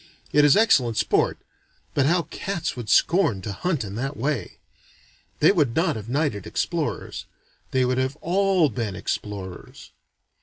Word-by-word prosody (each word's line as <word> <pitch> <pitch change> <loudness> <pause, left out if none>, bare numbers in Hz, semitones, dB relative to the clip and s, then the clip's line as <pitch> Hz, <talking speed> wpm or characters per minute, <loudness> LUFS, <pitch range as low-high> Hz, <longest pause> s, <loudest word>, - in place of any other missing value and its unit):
It 150 - +5
is 145 +3 +6
excellent 130 - +3
sport - - +1 0.6
but 140 -1 +2
how 170 +2 +2
cats 180 -6 -3
would 120 -4 -7
scorn 170 - +3
to 105 - -4
hunt 160 - -1
in 100 -2 -7
that 135 +4 -3
way! 130 -6 -2 0.8
They 155 - +7
would 145 - +1
not 165 -1 +2
have 110 0 -7
knighted 135 - -1
explorers - - -3 0.4
they 130 -1 +2
would 125 +1 0
have 130 +2 -1
all 185 -2 +2
been 110 -4 -3
explorers. 95 -4 -6
135 Hz, 150 wpm, -24 LUFS, 115-165 Hz, 0.8 s, They